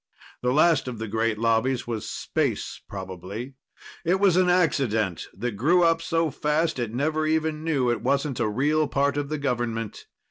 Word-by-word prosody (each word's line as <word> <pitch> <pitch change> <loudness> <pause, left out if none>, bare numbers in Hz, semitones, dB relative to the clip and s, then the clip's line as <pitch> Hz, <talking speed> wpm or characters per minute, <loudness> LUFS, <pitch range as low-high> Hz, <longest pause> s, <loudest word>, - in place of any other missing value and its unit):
The 125 - +1
last 155 0 +4
of 125 -2 -4
the 110 +1 -4
great 110 +1 0
lobbies 115 +3 +1
was 115 -3 -4
Space, - - -2
probably. 95 +6 -7 0.5
It 180 +3 +2
was 195 -3 +4
an 185 0 +4
accident 120 - +1
that 120 +5 -3
grew 155 - +3
up 165 -1 +3
so 165 -1 0
fast 150 +1 0
it 120 -3 -2
never 155 +5 0
even 155 0 0
knew 140 -7 +1
it 115 -3 -2
wasn't 140 +2 0
a 115 -3 +1
real 150 +7 +1
part 140 0 +1
of 145 -1 -2
the 155 - -2
government. 120 -5 -3
135 Hz, 175 wpm, -25 LUFS, 115-155 Hz, 0.5 s, last